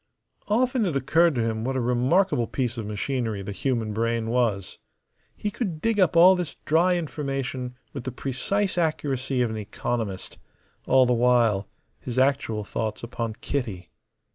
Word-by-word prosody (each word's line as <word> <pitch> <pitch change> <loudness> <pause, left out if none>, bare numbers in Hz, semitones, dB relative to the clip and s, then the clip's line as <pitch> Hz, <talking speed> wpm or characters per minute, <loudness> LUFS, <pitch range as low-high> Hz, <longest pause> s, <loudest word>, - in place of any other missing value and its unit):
Often 245 +1 +2
it 165 - -2
occurred 155 +4 +3
to 120 - +1
him 110 -1 -2
what 130 +2 -1
a - - +1
remarkable 125 +3 +2
piece 125 -3 -2
of 110 -3 -5
machinery 110 -1 -2
the 100 - -5
human 115 0 -1
brain 115 0 -1
was. 115 -6 0 0.6
He 210 - -2
could 190 -9 -3
dig 225 +3 0
up 180 -3 +3
all 185 +3 +8
this 180 -3 -4
dry 175 +3 +3
information 135 -5 -4 0.2
with 135 -4 -6
the 130 - -2
precise 180 - -1
accuracy 135 -5 0
of 115 - -1
an 110 - -4
economist, 105 -1 -4 0.5
all 130 0 +6
the 125 - +2
while 115 -5 +3 0.3
his 125 -1 -6
actual 130 -5 +1
thoughts 110 +2 -4
upon 115 -1 -3
Kitty. 110 -11 -3
125 Hz, 160 wpm, -25 LUFS, 115-155 Hz, 0.6 s, all